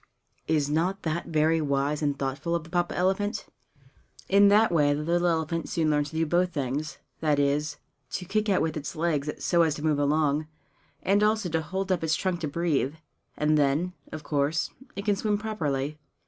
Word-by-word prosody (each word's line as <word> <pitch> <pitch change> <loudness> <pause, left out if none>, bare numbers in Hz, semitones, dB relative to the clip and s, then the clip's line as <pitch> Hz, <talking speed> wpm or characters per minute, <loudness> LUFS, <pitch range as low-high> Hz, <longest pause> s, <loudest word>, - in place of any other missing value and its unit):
Is 150 -3 +2
not 170 +6 0
that 165 +1 -2
very 160 0 +2
wise 140 +1 0
and 145 -2 0
thoughtful 140 +5 -2
of 170 - -2
the 165 - -15
Papa 175 -1 0
elephant? 195 +4 0 0.8
In 200 +1 +6
that 210 +1 +5
way 145 -3 +3
the 150 - -3
little 175 +2 +1
elephant 165 0 -1
soon 160 -2 +1
learns 150 -1 +1
to 160 - -11
do 165 0 +2
both 175 +3 +1
things 145 +1 -3 0.2
that 150 -2 +2
is, 145 +1 0 0.4
to 180 - -3
kick 215 +3 0
out 190 - +3
with 160 -1 -1
its 150 -2 -5
legs 155 -3 0 0.2
so 170 -1 +4
as 160 -3 +2
to 150 - -7
move 150 -2 +2
along, 150 +1 +1 0.6
and 200 +2 +3
also 210 -3 +2
to 160 0 0
hold 190 +4 -3
up 180 - 0
its 160 0 +2
trunk 185 -2 -1
to 160 - -2
breathe. 150 -2 0 0.4
And 150 0 +2
then, 145 +6 +1 0.2
of 155 -1 -6
course, 150 +3 0 0.2
it 200 +1 -5
can 205 -2 +3
swim 205 +1 0
properly. 155 -9 -2
160 Hz, 195 wpm, -27 LUFS, 150-180 Hz, 0.8 s, In